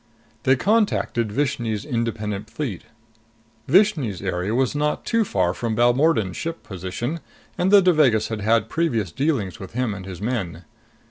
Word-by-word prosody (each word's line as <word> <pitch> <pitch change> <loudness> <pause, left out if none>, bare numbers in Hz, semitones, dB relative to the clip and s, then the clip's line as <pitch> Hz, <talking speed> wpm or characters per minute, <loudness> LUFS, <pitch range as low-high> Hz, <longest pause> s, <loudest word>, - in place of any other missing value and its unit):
They 130 0 +5
contacted 200 - +1
Vishni's 120 -5 -1
Independent 110 -5 -3
Fleet. 120 - -5 0.8
Vishni's 155 - +3
area 95 +3 -2
was 130 -1 +1
not 150 +1 -1
too 230 -1 +2
far 90 - 0
from 115 +2 -2
Balmordan's 120 - +2
ship 165 0 -5
position, 100 - -4 0.4
and 180 - +1
the 200 -1 +7
Devagas 150 - +3
had 110 -2 -4
had 110 +1 +2
previous 115 - -1
dealings 125 - -1
with 95 +1 -9
him 125 -3 -1
and 95 -1 -8
his 90 -3 -7
men. 100 -6 -3
115 Hz, 145 wpm, -23 LUFS, 100-150 Hz, 0.8 s, the